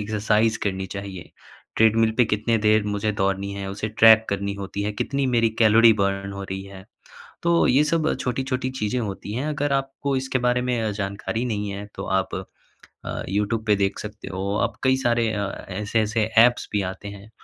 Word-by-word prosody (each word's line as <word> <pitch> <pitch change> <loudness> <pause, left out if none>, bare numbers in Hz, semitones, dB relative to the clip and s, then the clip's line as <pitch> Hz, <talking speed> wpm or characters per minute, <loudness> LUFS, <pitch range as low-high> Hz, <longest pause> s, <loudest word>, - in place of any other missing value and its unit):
Exercise 110 +1 +1
करनी 95 -1 -2
चाहिए, 100 -2 -7 0.5
treadmill 110 0 +4
पे 125 - +6
कितनी 110 +2 0
देर 110 0 +3
मुझे 105 +1 -1
दौड़नी 100 0 -1
है, 100 -1 -5
उसे 105 +2 -4
ट्रैक 110 +1 +6
करनी 100 0 -2
होती 100 0 -5
है, 105 +1 -2
कितनी 140 +6 -1
मेरी 115 -1 +3
कैलोरी 115 +1 +6
बर्न 100 0 -1
हो 100 0 -6
रही 95 0 -5
है। 95 -1 -12 0.6
तो 170 0 +3
ये 135 +4 +4
सब 155 +1 +1
छोटी-छोटी 130 +1 -2
चीज़ें 105 +4 -1
होती 100 0 -5
हैं। 130 +6 -2
अगर 145 -1 -1
आपको 135 0 -1
इसके 130 0 -1
बारे 125 0 +2
में 125 -1 -1
अ, 110 -1 -1
जानकारी 100 +3 -3
नहीं 105 -4 -2
है, 100 +1 -6
तो - - -5 0.2
आप 95 - -4 0.7
अ, - - -4
यूट्यूब 105 +3 -1
पे 105 - +5
देख 100 0 -1
सकते 105 0 -8
हो। 100 +2 -2
आप 115 -2 -2
कई 130 0 +3
सारे 120 -3 +1
अ, 100 -1 -1 0.2
ऐसे-ऐसे 105 +2 0 0.2
ऐप्स 120 0 0
भी 105 - +1
आते 100 - -10
हैं, 100 +1 -11
110 Hz, 190 wpm, -23 LUFS, 100-120 Hz, 0.7 s, पे